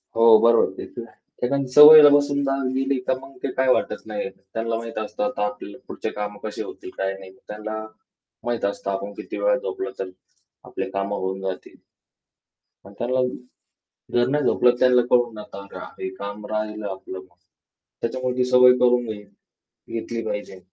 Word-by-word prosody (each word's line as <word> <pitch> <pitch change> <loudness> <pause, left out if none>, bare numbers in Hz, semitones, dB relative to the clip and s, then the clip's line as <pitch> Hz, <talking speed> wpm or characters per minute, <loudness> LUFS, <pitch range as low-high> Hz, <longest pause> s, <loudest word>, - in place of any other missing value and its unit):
हो 115 0 +5
बरोबर. 115 0 +4
ते - - -7
तर - - -9
आहे. - - -22 0.3
एखादी 140 +1 0
सवयला 150 0 +11
बसून 145 0 +1
जा 135 -1 0 0.2
गेली 135 0 0
तर 130 - +1
मग 135 +1 -14
ते 135 - -1
काही 130 -1 +3
वाटत - - -3
नाही. 105 -2 -4
त्यांना 115 +4 -4
माहीत 115 -1 -7
असतं 255 - -4
आता 255 - -1
आपली 105 0 -6
पुढची - - -4
कामं 105 0 -4
कशी 110 - -5
होतील - - -8
काय 95 0 -1
नाही. 95 -1 -12 0.2
त्यांना 110 +1 -5 0.6
माहीत 120 -3 -2
असतं 100 0 -3
आपण 100 +1 -4
किती - - -7
वेळा - - +3
झोपलं 440 -6 -5
तर 95 -1 -4 0.6
आपली 95 0 -5
कामं 100 +1 -2
होऊन 95 +1 -3
जातील. 95 -1 -6 1.1
पण 100 - -13
त्यांना 130 +2 0 0.9
जर 120 0 +3
नाही 145 +2 0
झोपलं 125 -2 +3
त्यांना 125 -1 +5
कळू 120 -1 +3
नका 100 -2 -9 0.3
हे 95 - -3
काम 100 +2 -7
राहिलं 105 -1 -3
आपलं 95 0 -8
मग. 95 -1 -17 0.7
त्याच्यामुळे 125 +1 -2
ती 125 - +3
सवय 125 0 +7
करून 125 0 +3
घे 105 -2 -6 0.4
घेतली 115 0 -6
पाहिजे. 105 -3 -5
115 Hz, 170 wpm, -23 LUFS, 100-130 Hz, 1.1 s, सवयला